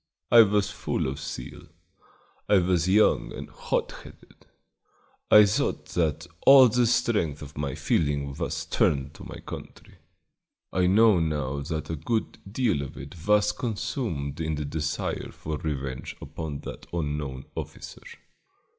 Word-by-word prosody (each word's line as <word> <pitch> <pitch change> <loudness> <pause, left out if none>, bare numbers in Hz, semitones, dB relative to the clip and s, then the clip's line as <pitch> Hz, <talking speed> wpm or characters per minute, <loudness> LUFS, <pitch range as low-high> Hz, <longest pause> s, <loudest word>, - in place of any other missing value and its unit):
I 120 - +10
was 105 -2 +2
full - - -2
of 70 +2 -3
zeal; 75 -5 -7 0.8
I 105 - +6
was 90 -1 +2
young 105 +3 +3
and - - -7
hot - - -2
headed; - - -17 0.8
I 105 -1 +9
thought 100 +1 -1
that 80 -1 0 0.2
all 135 -2 +9
the 120 +2 +2
strength 85 - +1
of 70 0 -11
my 70 -2 -3
feeling 70 -2 0
was - - -3
turned 70 0 +1
to - - -12
my - - -8
country. - - -10 0.7
I 90 -1 +2
know 105 0 +5
now 75 -4 -1
that 80 +2 -4
a - - -1
good 110 +10 -2
deal 110 - +1
of 70 - -7
it 70 +2 -8
was 105 0 +4
consumed 100 - -3
in 80 -1 -1
the 75 0 -3
desire 75 +1 -3
for 75 -1 -5
revenge 70 -4 -4
upon 75 -3 -6
that - - -9
unknown 75 -5 -3
officer. - - -8
80 Hz, 145 wpm, -26 LUFS, 70-105 Hz, 0.8 s, I